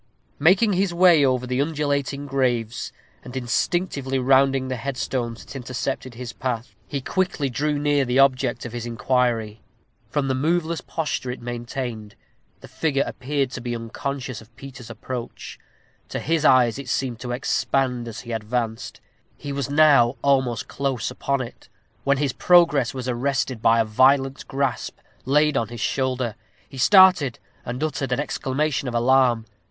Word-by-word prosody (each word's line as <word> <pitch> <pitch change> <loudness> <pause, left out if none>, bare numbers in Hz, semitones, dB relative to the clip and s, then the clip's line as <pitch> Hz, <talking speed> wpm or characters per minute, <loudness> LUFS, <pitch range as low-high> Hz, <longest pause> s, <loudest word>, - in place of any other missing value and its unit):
Making 190 +8 +4
his 190 0 +1
way 175 -4 +6
over 130 -2 +1
the 125 +1 0
undulating 145 -2 -1
graves, 120 -4 -1 0.3
and 125 +1 -7
instinctively 135 +2 -1
rounding 135 0 +3
the 130 - -2
headstones 125 -2 -3
that - - -11
intercepted 130 0 -4
his 120 -1 -7
path, 120 -1 -4
he 140 -2 -3
quickly 170 -4 -1
drew 150 +4 0
near 145 -1 +2
the 125 0 0
object 130 -3 +2
of 120 - -7
his 120 -1 -4
inquiry. 115 -3 0 0.5
From 145 -2 -1
the 135 - +1
moveless 160 +4 0
posture 150 -5 -3
it 125 - -4
maintained, 120 -3 -5 0.5
the - - -11
figure 140 -4 0
appeared 135 0 -2
to 130 - -6
be 120 0 -3
unconscious 130 +1 -5
of 110 +1 -19
Peter's 130 -4 -11
approach. 120 +1 -7 0.5
To - - -3
his 165 -1 0
eyes 125 -2 +4
it 140 - -7
seemed 125 -4 -1
to 125 0 -5
expand 125 -1 0
as 115 - -7
he 120 - -9
advanced. 115 0 -3 0.4
He 145 - -6
was 140 -1 -3
now 140 -5 +5
almost 130 -4 +1
close 135 -5 -2
upon 140 -1 -1
it, 120 - -9 0.3
when 140 0 +2
his 140 -2 0
progress 165 -9 +4
was 130 -1 -5
arrested 130 -1 -1
by 115 0 +4
a 115 - +3
violent 135 +4 +2
grasp 135 -2 -2 0.3
laid 150 +3 +3
on 115 -4 +1
his 120 0 -8
shoulder. 130 -3 -1 0.3
He 135 - -10
started, 185 - +6 0.3
and 125 +4 -4
uttered 140 -4 -2
an 125 - +1
exclamation 145 0 -1
of 120 - -3
alarm. 120 -1 +3
130 Hz, 160 wpm, -23 LUFS, 120-140 Hz, 0.5 s, way